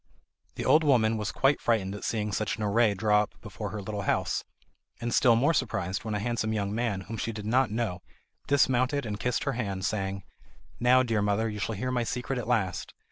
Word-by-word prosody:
The - - -4
old 160 - +5
woman 115 -6 +3
was 105 -1 -2
quite 135 +1 +2
frightened 105 -5 +1
at 105 - -7
seeing 105 -2 -1
such 110 +2 -1
an 110 - -3
array 105 0 +3
draw 105 +1 +3
up 105 - -6
before 105 0 -6
her 105 -2 -5
little 105 +1 -4
house, - - 0 0.6
and 120 0 -2
still 120 -2 +5
more 140 +8 +3
surprised 100 - -1
when 110 -1 -3
a - - -1
handsome 110 0 -1
young 100 -1 -1
man, 110 -4 -1
whom 110 +4 -7
she 115 - -2
did 105 -2 -7
not 125 +3 +2
know, 105 -5 -2 0.5
dismounted 135 0 +2
and 105 -2 -4
kissed 125 +3 -1
her 140 - -1
hand, 100 -5 -3
saying: 100 -3 -2 0.6
"Now, 125 +1 +5
dear 115 -4 0
mother, 105 +2 +1
you 105 -1 -4
shall 110 +2 -2
hear 125 +5 -2
my 125 -1 0
secret 125 +2 -3
at 115 - -5
last! 110 -7 -1
110 Hz, 215 wpm, -28 LUFS, 105-120 Hz, 0.6 s, old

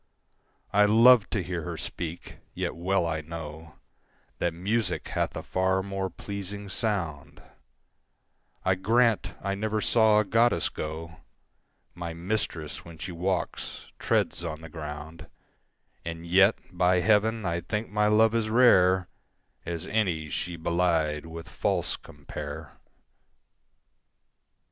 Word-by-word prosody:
I 105 0 +6
love 115 +1 +7
to 100 -5 -1
hear 90 -1 -3
her - - -5
speak, 85 0 -6 0.2
yet - - -2
well 90 +1 +1
I 80 -1 -1
know 80 0 -8 0.6
That 85 - +1
music 105 +7 -1
hath - - -1
a - - -5
far 95 0 +1
more 95 -1 -3
pleasing 100 +2 -6
sound; 90 - -3 1.3
I 95 - +4
grant 115 +4 +2
I 100 0 0
never 110 +2 -1
saw 110 -1 +4
a 105 - +3
goddess 115 -5 +3
go; 80 +2 -6 0.8
My 85 -1 -6
mistress, 85 -4 -3
when 85 -1 -12
she 90 - -6
walks, 90 +2 -3
treads - - +1
on 80 -2 -5
the 80 - -9
ground: 75 0 -8 0.8
And 85 0 -6
yet, 95 +5 +5 0.2
by 90 0 +3
heaven, 110 +3 +2
I 85 0 -1
think 105 +5 -3
my 105 0 +2
love 110 +1 +5
as 115 -2 0
rare 95 -6 +5 0.6
As 85 -2 -3
any 85 -9 0
she 90 +4 -3
belied 80 -2 0
with 80 +1 -8
false 85 - 0
compare. - - -8
90 Hz, 125 wpm, -27 LUFS, 85-105 Hz, 1.3 s, love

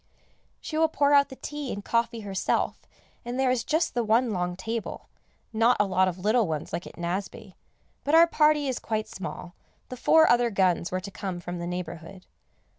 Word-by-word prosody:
She 310 - -4
will 320 - +5
pour 290 -2 +2
out 280 0 +5
the 265 - -9
tea 295 -1 -6
and 200 0 -6
coffee 230 0 0
herself, 195 -2 -2 0.4
and 245 +2 -4
there 265 -1 +3
is 255 -2 0
just 315 +1 0
the 240 - 0
one 230 +2 +2
long 180 -1 -2
table, 225 +4 -5 0.4
not 230 +3 +3
a 210 - +4
lot 185 -1 +2
of 180 -1 -3
little 215 +3 +2
ones 155 -2 -4
like 175 - -4
at - - -13
Nazeby; 190 +3 -4 0.5
but 290 +3 +2
our 335 +1 +8
party 300 -3 +2
is 260 - -2
quite 220 -1 -3
small, 180 -2 -7 0.4
the 255 - -6
four 320 +5 +5
other 240 0 +4
guns 185 -4 +1
were 185 0 -2
to 200 - -8
come 185 -2 -5
from 175 0 -6
the 170 - -4
neighbourhood. 180 +1 -7
220 Hz, 195 wpm, -26 LUFS, 185-255 Hz, 0.5 s, our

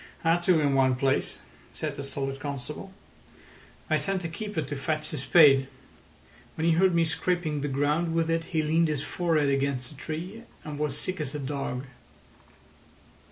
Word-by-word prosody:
"Had 165 +1 +4
to 180 -4 +5
in 145 -2 +2
one 130 -1 +4
place," 135 +1 0 0.3
said 155 -2 -3
the 140 -1 -6
stolid 135 0 -3
constable. 145 +6 -6 1.0
"I - - +3
sent 195 -2 -1
a 165 - -3
keeper 205 -1 -3
to 145 - -5
fetch 155 +2 -2
a - - -2
spade. 135 -2 +6 0.9
When 160 - -1
he 165 - +5
heard 180 +1 +4
me 165 -1 +4
scraping 160 -2 -1
the 145 - -1
ground 150 +4 0
with 165 -1 +2
it 165 0 0
he 160 -2 0
leaned 160 +2 +3
his 150 -2 -1
forehead 160 -5 +1
against 135 -2 0
a - - -12
tree, 170 - -6 0.2
and 150 -1 -6
was 150 -2 0
as 145 - -4
sick 185 -3 -3
as 145 -1 -4
a - - -3
dog." 135 -2 -3
150 Hz, 180 wpm, -27 LUFS, 140-165 Hz, 1.0 s, spade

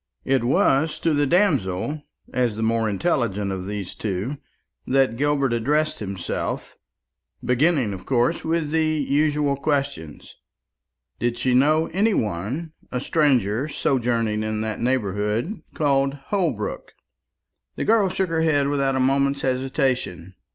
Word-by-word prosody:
It 135 -3 +2
was 135 +5 +2
to 165 - +2
the 145 -1 +2
damsel, 145 - +1 0.3
as 125 -4 +1
the 110 - -3
more 115 0 +1
intelligent 105 - 0
of 95 -1 -4
these 100 -3 -5
two, 105 +7 -3 0.5
that 130 -3 +2
Gilbert 140 -1 +1
addressed 150 +7 0
himself, 95 -4 -4 0.7
beginning 125 -3 +2
of 95 -1 -9
course 130 +5 +1
with 160 -2 -1
the 160 0 +2
usual 150 -1 +1
question. 140 - -2 1.0
Did 120 0 -1
she 130 0 +1
know 155 +5 +4
any 205 +3 +2
one, 110 - -2 0.2
a 125 - -1
stranger, 130 - +1
sojourning 115 -7 0
in 110 0 -2
that 110 -1 -3
neighbourhood 115 - -1
called 140 -2 +1
Holbrook? 145 - -3 0.8
The - - -3
girl 215 -3 +4
shook 185 0 -1
her 165 -1 0
head 145 -3 +2
without 140 -2 +1
a - - +1
moment's 140 +1 +2
hesitation. 130 - -1
135 Hz, 130 wpm, -23 LUFS, 110-150 Hz, 1.0 s, know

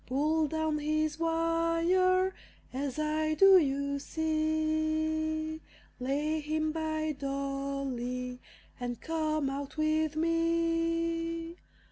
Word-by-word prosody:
Pull 305 +4 +1
down 315 0 -1
his 310 +1 0
wire, 335 +3 +2 0.4
as 270 +1 -3
I 310 0 0
do, 385 +2 +8
you 280 -1 0
see; 315 0 0 0.4
Lay 295 +5 0
him 310 +1 -1
by 315 -1 -1
Dolly, 275 -3 -3 0.4
and 245 -2 -4
come 310 -2 -1
out 280 +2 -5
with 310 0 +1
me. 330 0 0
315 Hz, 90 wpm, -30 LUFS, 285-330 Hz, 0.4 s, do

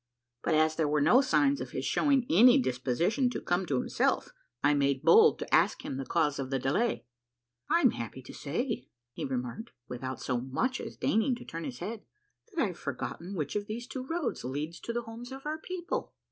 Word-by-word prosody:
But 165 - +1
as 155 0 +3
there 160 -2 +2
were 150 +1 +2
no 175 - +6
signs 275 +1 +2
of - - -5
his - - -3
showing 275 -4 +2
any 245 - +7
disposition 170 - +1
to - - -3
come 175 +1 0
to 135 - +1
himself, - - 0 0.3
1 145 +1 +4
made 140 0 +1
bold 165 - +7
to - - -6
ask - - +3
him 130 - -4
the 135 - -5
cause 150 -4 +1
of 130 -1 -3
the 135 - 0
delay. 145 - 0 0.3
" 120 0 -49
I'm 280 -9 +5
happy 120 +2 -6
to - - -11
say," 225 - -3 0.3
he - - -4
remarked, 130 - -4
without 130 +1 -5
so 125 -2 -1
much 230 - -1
as - - -8
deign 220 - +2
ing 250 +3 +1
to 240 - -11
turn 165 +1 -6
his 255 - -5
head, 220 0 -5 0.3
" - - -49
that 340 -4 0
I've 180 -3 -7
forgotten 165 +7 -5
which 150 -1 -3
of 205 0 -2
these 230 +3 -5
two 255 +1 -6
roads 325 0 -2
leads 145 +6 -4
to - - -5
the 240 0 -2
homes 235 +2 -9
of 270 +1 -8
our 310 +1 -2
people." 355 +1 -4
175 Hz, 215 wpm, -30 LUFS, -, 0.3 s, any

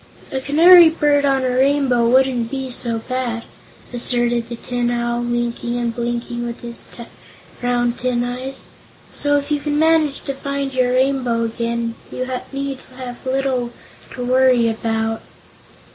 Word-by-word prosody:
"A 265 -2 -2
Canary 335 +5 +8
Bird 295 -2 +2
on 270 -1 +2
a 255 - +1
Rainbow 260 -3 +3
wouldn't 250 -2 +3
be 265 -1 -4
so 235 -1 -1
bad," 240 -1 -3 0.5
asserted 240 -1 0
the 240 - -4
Tin 245 0 -2
Owl, 240 0 -1
winking 240 0 -2
and 235 -1 -2
blinking 240 0 -3
with 235 0 -5
his 235 -1 -7 0.8
round 245 -1 0
tin 250 -1 0
eyes, 255 +2 -5 0.5
"so 290 0 +1
if 285 +1 -4
you 295 - +2
can 295 0 -1
manage 315 -2 +2
to 275 - -3
find 280 0 -3
your 250 -1 +2
Rainbow 255 -3 +1
again 230 0 -2 0.2
you 255 - -3 0.2
need 275 -1 -4 0.2
have 250 -2 -8
little 260 -2 0 0.4
to 250 -2 -5
worry 255 -2 +4
about." 225 0 -1
250 Hz, 145 wpm, -20 LUFS, 240-270 Hz, 0.8 s, Canary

